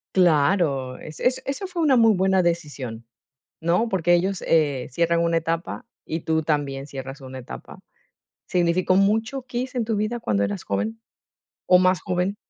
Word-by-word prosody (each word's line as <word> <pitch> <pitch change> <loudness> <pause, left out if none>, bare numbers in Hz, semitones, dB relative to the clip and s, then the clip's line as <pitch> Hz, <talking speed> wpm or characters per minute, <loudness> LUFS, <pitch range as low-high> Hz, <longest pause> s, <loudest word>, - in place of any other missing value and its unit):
Claro, 150 -6 +2
es 155 - -10 0.2
eso 280 +8 -4
fue 360 -2 -4
una 290 -4 +4
muy 225 -2 +6
buena 190 -1 +2
decisión, 145 -9 -3 0.6
¿no? 175 +8 +2
Porque 175 -4 +1
ellos, 185 +2 +1
eh, 145 -5 +2
cierran 170 +4 +1
una 170 0 +2
etapa 165 +1 -3 0.2
y 160 - -3
tú 160 0 0
también 140 -3 -1
cierras 135 0 -8
una 130 0 -8
etapa. 125 - -10 0.7
¿Significó 180 +1 +2
mucho 220 +6 +1
KISS 250 +1 -4
en 235 -3 0
tu 225 -1 0
vida 215 +3 -1
cuando 100 - 0
eras 100 -1 -4
joven 105 +3 -2 0.7
o 180 - +6
más 185 -2 +3
joven? 185 +3 -1
170 Hz, 160 wpm, -23 LUFS, 140-195 Hz, 0.7 s, muy